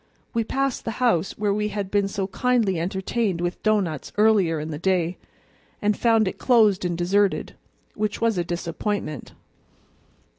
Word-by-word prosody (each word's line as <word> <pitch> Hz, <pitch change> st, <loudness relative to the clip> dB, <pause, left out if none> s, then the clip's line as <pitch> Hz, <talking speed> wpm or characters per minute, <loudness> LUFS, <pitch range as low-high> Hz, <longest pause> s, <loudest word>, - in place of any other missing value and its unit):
We 230 Hz, -, +1 dB
passed 270 Hz, +3 st, -1 dB
the 225 Hz, -, -4 dB
house 225 Hz, -9 st, +1 dB
where 205 Hz, -1 st, +1 dB
we 210 Hz, +1 st, 0 dB
had 205 Hz, -2 st, -4 dB
been 200 Hz, -1 st, +2 dB
so 195 Hz, -1 st, -2 dB
kindly 215 Hz, -3 st, +1 dB
entertained 190 Hz, +2 st, -1 dB
with 175 Hz, 0 st, -3 dB
doughnuts 195 Hz, -9 st, 0 dB
earlier 205 Hz, -7 st, +3 dB
in 155 Hz, +1 st, -5 dB
the 150 Hz, -, -5 dB
day, 180 Hz, -1 st, 0 dB, 0.6 s
and 210 Hz, 0 st, +1 dB
found 225 Hz, -3 st, +3 dB
it -, -, -4 dB
closed 215 Hz, -6 st, +4 dB
and 175 Hz, -2 st, -1 dB
deserted, 195 Hz, +3 st, +1 dB, 0.4 s
which 210 Hz, -1 st, -2 dB
was 230 Hz, -1 st, +2 dB
a -, -, +1 dB
disappointment. 170 Hz, -, -4 dB
200 Hz, 155 wpm, -24 LUFS, 175-215 Hz, 0.6 s, closed